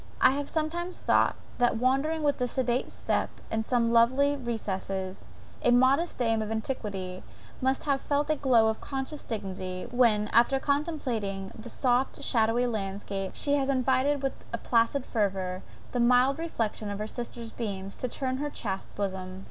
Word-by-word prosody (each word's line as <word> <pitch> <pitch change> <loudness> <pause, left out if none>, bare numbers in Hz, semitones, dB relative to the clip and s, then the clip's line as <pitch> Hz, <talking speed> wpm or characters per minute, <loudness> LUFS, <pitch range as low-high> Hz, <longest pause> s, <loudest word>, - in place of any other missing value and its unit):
I 255 - +6
have 285 +1 -3
sometimes 340 +3 -2
thought, - - +3 0.2
that 245 -2 +3
wandering 275 +6 +1
with 275 -4 +1
sedate 255 -1 0
step - - -1 0.2
in 220 0 0
some 235 0 +2
lonely 260 +5 +4
recess, 195 -6 -4 0.3
a - - +3
modest 260 +7 +4
dame 225 -3 +1
of 215 - -3
antiquity 205 -5 -3 0.4
must 265 +1 +1
have 280 -3 +1
felt 290 +1 0
a - - +3
glow 255 -6 +4
of 220 0 -1
conscious 270 +2 -4
dignity, 185 -4 -4
when, 230 -4 +4
after 240 +4 +4
contemplating 255 - -1
the 230 +2 -9
soft 250 +1 0
shadowy 230 +1 +2
landscape, 195 -3 -3
she 285 - +1
has 275 -1 0
invited 270 +2 +2
with 270 - 0 0.3
placid 235 +3 +2
fervour 190 -4 -1 0.3
the 245 - -1
mild 250 +4 +4
reflection 225 -10 -2
of 200 - -3
her 210 - -3
sister's 235 0 -6
beams 195 -4 -4
to 255 - -2
turn 260 +1 -2
to - - -5
her 295 - -1
chaste 195 -8 -4
bosom. 190 -2 -3
240 Hz, 160 wpm, -28 LUFS, 210-270 Hz, 0.4 s, I